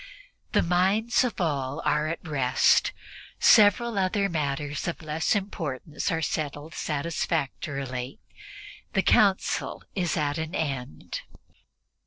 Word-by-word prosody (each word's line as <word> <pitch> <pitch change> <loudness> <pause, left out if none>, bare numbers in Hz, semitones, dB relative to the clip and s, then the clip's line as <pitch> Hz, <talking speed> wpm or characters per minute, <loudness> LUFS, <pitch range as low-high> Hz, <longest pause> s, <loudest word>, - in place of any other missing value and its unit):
The - - +4
minds 195 +8 +2
of 245 -4 -2
all 140 -6 -1
are 150 +1 +2
at 165 +1 -5
rest. 135 -4 +3 0.5
Several 215 +1 +5
other 195 +1 +1
matters 145 -2 -2
of 170 -1 -4
less 155 +5 0
importance 160 -6 -3
are 165 -1 -1
settled 150 +1 -3
satisfactorily. 140 -4 -3 0.8
The 195 - +2
Council 195 -3 +2
is 175 -4 -1
at 150 0 0
an 160 +2 -4
end. 130 - -4
160 Hz, 110 wpm, -26 LUFS, 145-185 Hz, 0.8 s, Several